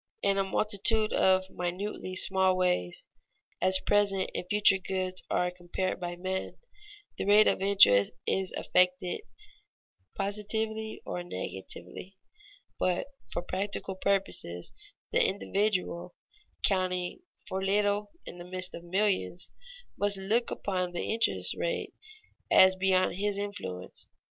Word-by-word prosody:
In 195 0 +2
a - - +3
multitude 215 +2 +1
of 190 0 +3
minutely 185 +1 -4
small 190 0 +3
ways, 180 - 0 0.6
as 185 0 +5
present 200 -2 +1
and 180 - -4
future 205 -2 +7
goods 185 0 -3
are 180 0 +1
compared 180 +1 -3
by 175 -1 -4
men, 185 +1 -4 0.6
the - - -1
rate 210 +2 +6
of - - +1
interest 145 - +5
is 190 -1 0
affected 180 0 +1 1.0
positively 220 +2 -2
or 175 - -4
negatively. 95 - -7 0.6
But 185 +8 0 0.2
for 175 - -2
practical 195 +1 -3
purposes 190 - -2 0.4
the - - +3
individual, 190 -3 -1 0.5
counting 185 - 0 0.3
for 190 0 -3
little 205 +1 +1 0.2
in 175 - -9
the 175 - -8
midst 185 0 0
of 170 - -8
millions, 175 - -1 0.5
must 205 -1 +3
look 215 +5 0
upon 180 -3 -2
the 175 - -2
interest 230 +1 +1
rate - - -3 0.6
as 190 0 +7
beyond 185 -1 +2
his 205 0 -1
influence. 200 - -6
190 Hz, 120 wpm, -29 LUFS, 180-200 Hz, 1.0 s, future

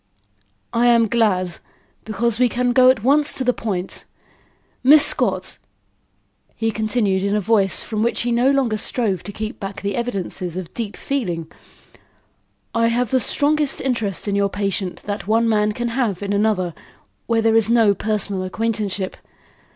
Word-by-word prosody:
"I 235 +1 +3
am 235 -1 +4
glad, 190 -6 +1 0.5
because 225 +1 0
we 250 -1 +4
can 245 +1 0
go 255 0 +6
at 255 -5 +2
once 290 +3 +2
to 260 - -2
the 250 0 +2
point. 195 -6 -4 0.8
Miss 290 +3 +7
Scott," - - 0 1.0
he 225 0 -1
continued 215 -3 0
in 200 +1 0
a - - +2
voice 200 -1 +2
from 215 -2 -3
which 235 +2 0
he 240 - -1
no 240 +3 +3
longer 265 -6 +1
strove 205 -4 -1
to 205 - -8
keep 215 +3 -6
back 195 -1 -6
the 200 0 -2
evidences 190 -7 -3
of 185 -3 -7
deep 225 -4 -5
feeling, 175 - -3 1.2
"I 230 0 +2
have 240 0 0
the 260 - +3
strongest 290 +2 +1
interest 225 -8 -2
in 200 - 0
your 200 0 +1
patient 195 -2 -3
that 205 -1 -5
one 225 +2 +2
man 210 -1 +2
can 240 +2 -3
have 230 -6 -1
in 200 0 -2
another, 200 -4 +1 0.5
where 230 -1 +1
there 225 0 +3
is 225 -1 +4
no 225 -3 +4
personal 205 -1 -2
acquaintanceship. 205 -1 -2
220 Hz, 165 wpm, -20 LUFS, 200-240 Hz, 1.2 s, Miss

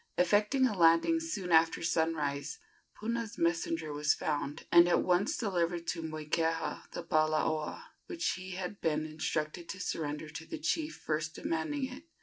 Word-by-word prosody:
Effecting 210 +8 +3
a 225 -5 +1
landing 170 - +5
soon 220 - -4
after 165 0 +4
sunrise, 160 - 0 0.4
Puna's 230 0 -3
messenger 165 -2 0
was 150 +1 +2
found, 145 -1 -3
and 170 0 +8
at - - +3
once 180 +3 +2
delivered 175 -5 -1
to 170 - -2
Moikeha 160 +1 -2
the - - -5
palaoa, 155 -1 +1 0.2
which 340 0 -1
he 185 0 -6
had 190 +2 -5
been 155 -1 0
instructed 155 +2 -3
to 185 - -5
surrender 155 -4 -3
to 155 +2 -8
the - - -5
chief 315 0 -1
first 155 0 -3
demanding 260 - -2
it. 260 +4 -9
165 Hz, 150 wpm, -32 LUFS, 155-200 Hz, 0.4 s, and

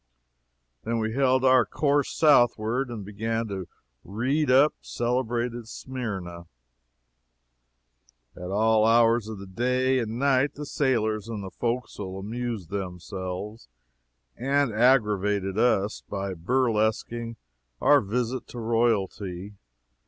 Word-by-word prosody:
Then 115 0 -1
we 110 0 -1
held 130 0 +2
our 130 -1 +6
course 145 +6 +1
southward, 120 -3 +3
and 110 -5 -6
began 115 +3 -2
to 95 -3 -5 0.4
"read 130 - -1
up" 135 +4 +5
celebrated 120 -1 -2
Smyrna. 95 -10 -6 1.9
At 90 0 -7
all 110 +2 +3
hours 115 -1 +4
of 110 -1 -6
the 100 - -9
day 125 +6 +1
and 115 -1 -3
night 135 +1 +2
the 150 - -6
sailors 110 -8 0
in 110 -3 -4
the 95 -1 -7
forecastle 110 -4 -3
amused 110 -2 -5
themselves 95 - -6 0.7
and 135 -1 +1
aggravated 105 -5 +2
us 105 -4 +1
by 100 -1 -3
burlesquing 115 +3 0 0.4
our 145 -1 +5
visit 125 +4 -2
to 120 - -8
royalty. 105 -4 -1
115 Hz, 110 wpm, -26 LUFS, 100-125 Hz, 1.9 s, our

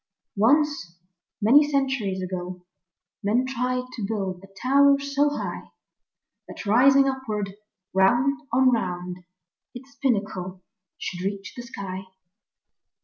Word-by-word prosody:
ONCE, 255 - +2 0.5
many 270 +8 +7
centuries 265 -10 -1
ago, 180 -1 -5 0.6
Men 225 +5 +1
tried 255 0 -1
to 225 - -5
build 195 -4 -3
a - - -12
tower 280 +2 +5
so 280 +1 +1
high 290 - -5 0.8
That - - -9
rising 270 +6 +5
upward, 215 -7 -3 0.4
round 240 +9 +3
on 255 +1 +4
round, 180 -5 -2 0.6
Its 265 +3 -11
pinnacle 190 -7 -1 0.3
should 175 -1 -5
reach 195 0 -4
the 240 - -6
sky. 195 -6 -7
230 Hz, 110 wpm, -25 LUFS, 190-270 Hz, 0.8 s, many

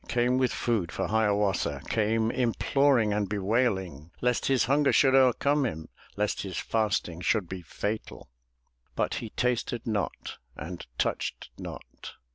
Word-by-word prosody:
Came 125 +1 +2
with 130 -1 +2
food 110 -8 -1
for - - -2
Hiawatha, 105 -10 +1
Came 110 +1 +1
imploring 125 -1 +2
and 105 -2 -1
bewailing. 95 - 0
Lest 125 -1 +1
his 135 -2 +3
hunger 140 +3 +3
should 135 -2 +4
overcome 135 +2 +4
him, 80 -11 -4 0.3
Lest 105 0 -1
his 95 -2 -5
fasting 105 -6 -1
should 100 0 +1
be 95 0 -6
fatal. 105 +3 -5 0.7
But - - 0
he 115 - -6
tasted 120 0 -1
not, 105 -3 -3 0.2
and 85 -3 -7
touched - - -2
not. - - -9
110 Hz, 135 wpm, -28 LUFS, 100-125 Hz, 0.7 s, should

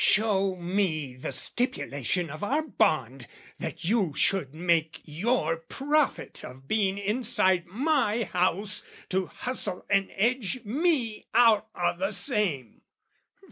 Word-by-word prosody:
"Show 195 -3 +3
me 175 -6 -1
the 130 - -6
stipulation 175 - -1
of 155 +6 -7
our 285 +9 +1
bond 135 - 0 0.3
"That - - -5
you 190 -6 +1
should 185 -9 +1
make 160 0 0
your 165 0 0
profit 280 - -1
of 130 +2 -11
being 200 -1 +1
inside 200 -4 +1
"My 240 - +1
house, 185 +1 0 0.3
to 190 -1 0
hustle 210 -7 -2
and 195 -1 +3
edge 240 +2 0
me 250 -2 0
out 225 -3 +5
o' 175 -1 0
the 195 +4 -2
same. 180 - -1
195 Hz, 120 wpm, -27 LUFS, 165-230 Hz, 0.3 s, out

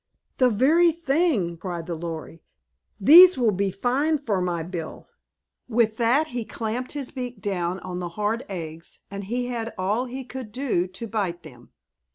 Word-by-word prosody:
"The 255 -1 +5
very 310 +10 +4
thing!" 290 - 0
cried 175 -1 -5
the 175 - -4
Lory. 165 0 -6 0.6
"These 340 - +9
will 235 -4 +3
be 200 0 0
fine 255 - 0
for 220 -10 -1
my 175 -2 -1
bill!" 170 -2 -7 0.6
With 220 -2 +2
that 255 +7 +2
he 240 -1 -3
champed 230 +3 -4
his 280 -3 -5
beak 250 -4 -6
down 185 -2 -2
on 180 0 -5
the 175 -1 -4
hard 215 +4 -1
eggs 165 -3 -7
and 200 0 -6
he 245 +4 -2
had 230 -2 -4
all 205 +7 0
he 260 +1 -6
could 250 -2 -8
do 235 -8 0
to 185 +5 -7
bite 190 -6 -2
them. 125 -6 -14
220 Hz, 170 wpm, -24 LUFS, 180-255 Hz, 0.6 s, These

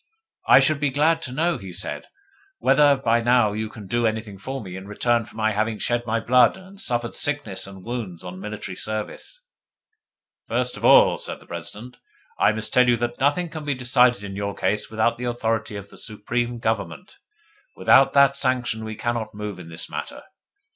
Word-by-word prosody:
'I - - +8
should 155 -2 +3
be 145 -1 +1
glad 155 +4 +2
to 130 - -5
know,' 165 +6 0
he 95 -2 -9
said, 90 +3 -5 0.5
'whether 145 - +4
by 120 -3 +2
now 120 -3 +3
you 110 +1 -3
can 105 -2 -11
do 120 +4 +1
anything 110 -3 -4
for 135 +7 -5
me 95 -5 -8
in 95 +1 -8
return 115 +2 +1
for - - -17
my 110 0 +1
having 110 +1 -1
shed 120 +1 -1
my 115 +1 +1
blood 125 +4 +4
and 190 +1 -13
suffered 120 -1 -2
sickness 110 -11 -2
and 95 -1 -11
wounds 110 -8 -5
on 90 0 -8
military 105 -2 -6
service.' 110 - -6 1.0
'First - - -1
of - - -10
all,' - - +6
said - - -4
the - - -18
President, 125 +4 -8 0.4
'I - - +5
must 110 0 -5
tell 125 -1 +5
you 120 - +4
that 120 +1 -3
nothing 145 +6 +1
can 155 -1 -7
be 145 -2 -1
decided 125 -3 +3
in 100 -1 -6
your 100 0 -3
case 100 +2 -1
without 110 +1 +1
the 125 - -5
authority 115 -3 -2
of 100 0 -8
the - - -13
Supreme 120 +3 -3
Government. 115 - -3 0.6
Without - - +5
that 140 -1 +5
sanction 125 -5 0
we 110 0 -5
cannot 110 -1 -3
move 105 -2 -6
in 85 -2 -10
the 80 0 -5
matter. - - -6
115 Hz, 195 wpm, -23 LUFS, 105-125 Hz, 1.0 s, I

